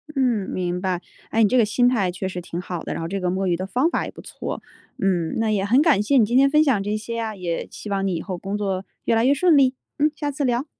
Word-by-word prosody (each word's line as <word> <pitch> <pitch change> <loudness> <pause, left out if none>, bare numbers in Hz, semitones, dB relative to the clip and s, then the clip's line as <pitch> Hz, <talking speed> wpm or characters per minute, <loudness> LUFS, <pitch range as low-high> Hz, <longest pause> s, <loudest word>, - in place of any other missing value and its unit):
嗯， 245 -7 +1
明 180 -1 -2
白。 185 -2 -1 0.3
哎， 225 - +2
你 210 - +4
这 255 - +3
个 235 - +5
心 245 +4 +2
态 210 -8 +2
确 190 +2 -4
实 180 -1 -5
挺 170 0 -6
好 175 -2 -5
的， - - -4
然 - - -4
后 165 - -3
这 195 +3 -3
个 180 -1 -1
摸 190 +1 -1
鱼 175 - +2
的 185 +2 -4
方 255 - +1
法 - - -1
也 - - -7
不 - - -12
错。 - - -6 0.4
嗯， 175 -4 0
那 225 -1 +1
也 200 -2 +1
很 245 +7 +4
感 305 - +4
谢 275 +6 +3
你 230 - +6
今 240 +4 +1
天 275 +1 +6
分 305 +2 +5
享 250 -10 +2
这 205 +1 -1
些 230 +2 -6
呀， 225 -2 -3
也 175 -3 -3
希 210 - -8
望 195 -1 0
你 190 - 0
以 165 - -3
后 185 -1 -5
工 195 +3 -4
作 195 -2 -2 0.2
越 230 - +2
来 225 +1 +3
越 275 - +5
顺 320 +2 +4
利。 265 -1 +4 0.2
嗯， 300 +1 +3
下 295 -1 -2
次 285 +1 -3
聊。 245 +1 +1
210 Hz, 315 characters per minute, -23 LUFS, 185-255 Hz, 0.4 s, 你